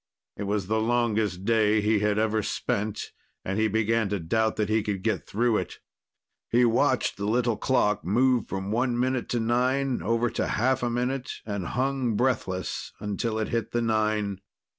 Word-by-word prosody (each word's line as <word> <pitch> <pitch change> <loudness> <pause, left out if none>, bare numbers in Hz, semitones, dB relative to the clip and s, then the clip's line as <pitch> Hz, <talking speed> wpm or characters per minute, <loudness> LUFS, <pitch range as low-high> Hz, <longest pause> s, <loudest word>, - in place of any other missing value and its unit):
It 100 - -4
was 100 -1 -1
the 110 +3 0
longest 110 -5 0
day 110 -1 +3
he 105 0 +2
had 105 0 +1
ever 110 0 +1
spent, 105 0 -2 0.3
and 95 +3 -1
he 110 - +3
began 110 0 +1
to 100 0 -1
doubt 110 +7 0
that 105 -1 0
he 110 +1 +2
could 100 -3 -3
get 105 -10 -1
through 115 +1 +1
it. 90 - -4 0.7
He 120 +1 +4
watched 115 0 +2
the 100 +1 -3
little 120 +1 +1
clock 105 -6 +1
move 120 +6 +2
from 95 +1 -4
one 120 +1 +1
minute 130 0 0
to 120 - 0
nine 125 +1 +1
over 115 +5 +1
to - - -1
half 130 +3 +1
a 120 - 0
minute 125 +2 -2
and 100 -5 -3
hung 130 -3 0
breathless 100 -7 -1
until 105 +2 -2
it 110 - -2
hit 115 -2 -2
the 120 - +1
nine. 105 -3 0
110 Hz, 180 wpm, -26 LUFS, 105-120 Hz, 0.7 s, He